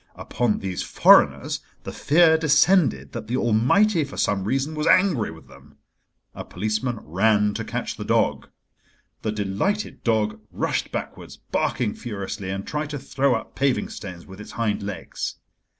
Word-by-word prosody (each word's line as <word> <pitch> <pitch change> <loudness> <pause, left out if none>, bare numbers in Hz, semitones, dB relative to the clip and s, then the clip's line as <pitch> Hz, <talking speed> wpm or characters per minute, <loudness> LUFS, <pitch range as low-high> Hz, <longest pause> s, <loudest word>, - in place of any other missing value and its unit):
Upon 120 -2 -1
these 95 -2 -4
foreigners - - +4 0.2
the - - -6
fear 160 +2 +4
descended 160 +2 +3
that 115 -2 -7
the 125 +3 -1
Almighty, 145 - +3
for 140 - -9
some 95 -2 0
reason, 135 +7 -1
was 150 0 -2
angry 180 - +3
with 80 0 -12
them. 70 +1 -18 0.6
A - - -7
policeman 110 +5 -2
ran 105 +5 +2
to - - -4
catch - - -4
the - - -5
dog. - - 0 0.7
The 110 - -1
delighted 105 - -2
dog 110 -2 0
rushed - - -2
backwards, - - -6
barking 115 -5 -1
furiously, 100 -3 -6
and 95 +1 -4
tried 150 0 -3
to 145 - -4
throw 135 -1 0
up 115 - -6
paving 135 -2 0
stones 90 -4 -8
with 95 +2 -11
its - - -11
hind 115 -3 -1
legs. 100 -4 -5
110 Hz, 155 wpm, -23 LUFS, 100-145 Hz, 0.7 s, foreigners